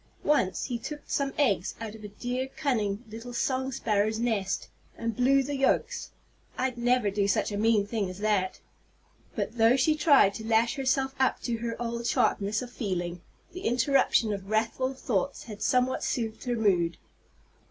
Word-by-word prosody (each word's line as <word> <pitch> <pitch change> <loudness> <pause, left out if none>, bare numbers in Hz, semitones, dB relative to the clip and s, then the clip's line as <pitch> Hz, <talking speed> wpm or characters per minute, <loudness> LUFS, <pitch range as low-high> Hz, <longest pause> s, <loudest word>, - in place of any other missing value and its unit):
Once 190 -12 +2
he 245 -3 -3
took 295 +5 -6
some 275 -1 -1
eggs 200 - +1
out 225 -2 -5
of 220 -1 -12
a - - -5
dear, 245 +5 -3
cunning, 225 -8 0
little 230 +3 -8
song 260 +2 -1
sparrow's 215 -2 0
nest, 220 -5 -1 0.3
and 230 -1 -2
blew 270 +3 +4
the 285 +2 -3
yolks. 450 - 0 0.5
I'd 255 -1 -1
never 240 -3 +2
do 200 0 +1
such 200 - +1
a - - -3
mean 215 -1 +3
thing 205 -2 -2
as 185 - -8
that." 205 -3 0 0.8
But 230 +1 -3
though 225 +2 +6
she 270 +4 +3
tried 285 -10 +5
to 220 - -7
lash 230 +1 +3
herself 265 0 0
up 260 - +2
to 235 -2 -2
her 230 0 -4
old 235 0 -3
sharpness 210 +2 +1
of 245 - -9
feeling, 175 -6 -3 0.3
the 365 - -7
interruption 245 - +2
of 195 -1 -6
wrathful 230 +5 0
thoughts 255 +1 -2
had 210 -3 -9
somewhat 255 0 +1
soothed 225 -1 -2
her 245 -1 0
mood. 180 -7 +2
230 Hz, 175 wpm, -28 LUFS, 210-260 Hz, 0.8 s, though